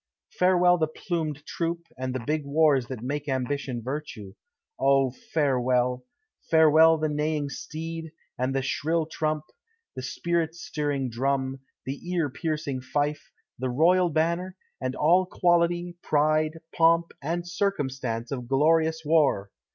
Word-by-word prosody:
Farewell 180 -1 +4
the 155 - +2
plumed 155 -3 -4
troop, 170 +1 -3
and 130 0 -4
the 130 - -3
big 155 +1 0
wars 140 -3 +3
that 125 -4 -6
make 145 +3 -3
ambition 130 -2 -2
virtue! 125 -7 -6 0.5
O, 135 -1 +3
farewell! 125 -3 0 0.4
Farewell 160 0 +6
the 155 0 0
neighing 150 -1 -1
steed, 160 +3 -6 0.2
and 130 +2 -1
the 135 - 0
shrill 160 +4 0
trump, 155 -1 -2 0.5
the - - -5
spirit 165 +4 -1
stirring 145 -6 -2
drum, 135 +2 -1 0.3
the 135 +2 -4 0.2
ear 160 -6 0
piercing 150 -2 -3
fife, 145 +3 -2 0.3
the 130 0 -1
royal 175 +7 +4
banner, 170 +4 -1 0.2
and 130 0 -2
all 180 +4 +3
quality, 175 -1 +1
pride, 155 +1 +1 0.2
pomp, 165 0 +4
and 170 +4 -3
circumstance 135 - -2
of 125 -3 -4
glorious 160 +4 +2
war! 145 -11 +2
150 Hz, 130 wpm, -26 LUFS, 130-165 Hz, 0.5 s, Farewell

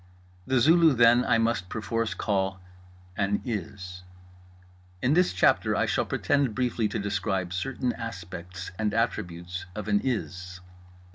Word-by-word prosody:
The 130 -1 +3
Zulu, 160 +3 +6
then, 120 +1 +6
I 120 - +3
must 115 -5 0
perforce 115 +1 -2
call 95 -2 -1 0.6
an 100 +1 +1
IS. 90 -5 -5 1.0
In 125 +7 +2
this 180 +2 +4
chapter 90 - +3
I - - +2
shall - - 0
pretend 140 -6 +1
briefly 120 -3 0
to 105 - -3
describe 95 -3 -2
certain 125 +7 -2
aspects 90 -4 -7
and 105 -1 0
attributes 90 -5 -2
of 105 -1 -5
an 100 -1 +2
IS. 95 -7 -3
105 Hz, 135 wpm, -27 LUFS, 95-120 Hz, 1.0 s, Zulu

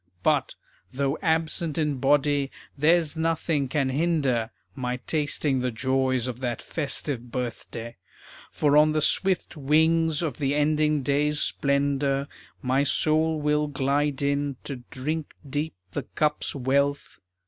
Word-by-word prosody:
But, - - +2 0.4
though 140 +2 -1
absent 160 -1 0
in 150 -3 0
body, 145 +1 +2 0.3
there's 160 +1 +3
nothing 160 -3 0
can 135 0 0
hinder 135 -6 +1 0.2
My 125 -2 -3
tasting 145 -3 0
the 125 0 0
joys 130 +1 0
of 125 -1 -4
that 120 -3 -2
festive 140 -5 -3
birthday; 120 -2 -5 0.5
For 145 -1 +2
on 155 0 +5
the 155 - +1
swift 185 +3 +1
wings 160 +2 +2
of 150 -7 -2
the 140 -1 +1
ending 150 0 +2
day's 145 +2 +1
splendor 140 -1 +1 0.4
My 130 +2 +2
soul 155 +2 +2
will 150 0 +1
glide 140 0 0
in 140 0 0
to 140 - -5
drink 150 +4 -4
deep 145 +1 -2 0.2
the - - -2
cup's 150 -1 -1
wealth. 140 +2 0
145 Hz, 130 wpm, -26 LUFS, 135-155 Hz, 0.5 s, on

